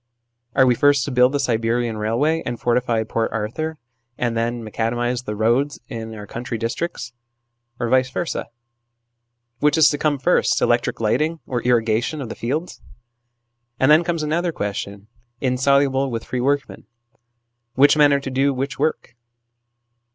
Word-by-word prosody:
Are 130 - +5
we 125 - +4
first 140 +1 +3
to 145 - -4
build 125 0 +4
the 145 - -1
Siberian 115 -2 0
railway 120 +10 0
and 120 -1 -4
fortify 120 -2 +1
Port 115 +1 -2
Arthur, 120 +9 -3 0.4
and 120 -1 -1
then 115 +1 -1
macadamise 120 +3 -2
the 105 - -4
roads 120 +7 +1
in 110 -1 -6
our 105 -1 -8
country 115 +2 -5
districts, 115 +1 -4 0.7
or 120 - -1
vice 130 +1 +2
versd? 165 +6 -3 1.1
Which 150 +1 +3
is 160 - +7
to 145 - -2
come 150 -2 +1
first: 130 - +2
electric - - +1
lighting 150 +9 0
or 125 -2 -2
irrigation 120 +4 +1
of 130 -5 -5
the - - -6
fields? 150 +9 -4 1.0
And 135 +3 +4
then 155 +3 +6
comes 170 -2 -2
another 170 +3 0
question, 100 -4 -5 0.3
in 125 -2 -1
soluble 140 0 +2
with 115 -2 -4
free 125 - -3
workmen: 140 -4 -1 0.9
which 145 +3 +6
men 145 -1 +5
are 140 - +3
to 135 - -5
do 135 +1 +1
which 135 +2 -4
work 150 -5 -2
125 Hz, 160 wpm, -21 LUFS, 115-145 Hz, 1.1 s, is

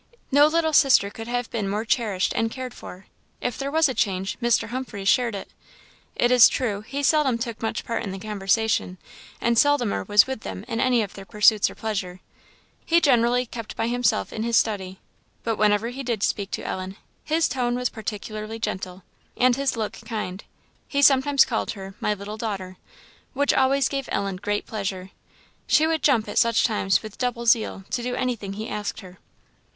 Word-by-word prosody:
No 290 +2 +6
little 320 0 +1
sister 260 -8 +5
could 225 +1 -8
have 245 0 -2
been 210 -4 -2
more 210 +3 -2
cherished 215 -5 0
and 225 - +1
cared 255 +1 -6
for. 185 +1 -11 0.3
If 245 - -3
there 275 0 -2
was 320 +1 +3
a 260 - -2
change, 195 -4 -1
Mr. 235 -2 +1
Humphreys 240 -6 -5
shared 240 -2 +3
it. 195 - -8 0.6
It 240 - +2
is 250 -2 +8
true, 215 -7 -2
he 270 +6 -5
seldom 280 -5 +3
took 235 -1 -5
much 225 - -3
part 230 - -2
in 215 - -4
the 190 - -5
conversation, 205 -1 0 0.4
and 235 -1 +2
seldomer 290 -7 +2
was 205 0 +6
with 265 -3 -4
them 200 - -7
in 230 -2 -3
any 245 -3 +3
of 200 - -7
their 195 - -9
pursuits 210 +1 +3
or - - -11
pleasures. 195 -5 -4 0.7
He 335 +1 +3
generally 245 -4 +3
kept 230 -2 -8
by - - -1
himself 245 0 0
in 220 - -4
his 230 0 +2
study. 190 -3 -1 0.4
But 225 -2 -1
whenever 210 +2 +2
he 260 +3 -6
did 235 -6 -2
speak 200 -1 -1
to - - -5
Ellen, 185 +1 -4 0.3
his 320 +1 +1
tone 245 -1 -1
was 250 0 -1
particularly 215 0 -6
gentle, 190 -4 -5 0.3
and 250 -1 +4
his 275 -2 -1
look 220 -2 -2
kind. 210 -4 -5 0.4
He 280 0 0
sometimes 275 0 +5
called 230 -3 -2
her 195 -2 -9
"My 210 -3 0
little 205 +2 -7
daughter," 195 -5 -5 0.6
which 285 +1 +2
always 270 +1 +3
gave 275 -2 -4
Ellen 195 -2 -1
great 205 +2 -2
pleasure; 195 -3 -5 0.6
she 310 - +4
would 320 0 0
jump 235 -7 +3
at 205 - 0
such 230 -1 +3
times 210 -3 +1
with 215 -2 -10
double 245 -2 -2
zeal, 225 -4 +2
to 245 - -1
do 245 +1 -3
anything 235 -7 -2
he 215 +2 -5
asked 210 +1 -4
her. 185 -2 -14
225 Hz, 190 wpm, -24 LUFS, 205-250 Hz, 0.7 s, is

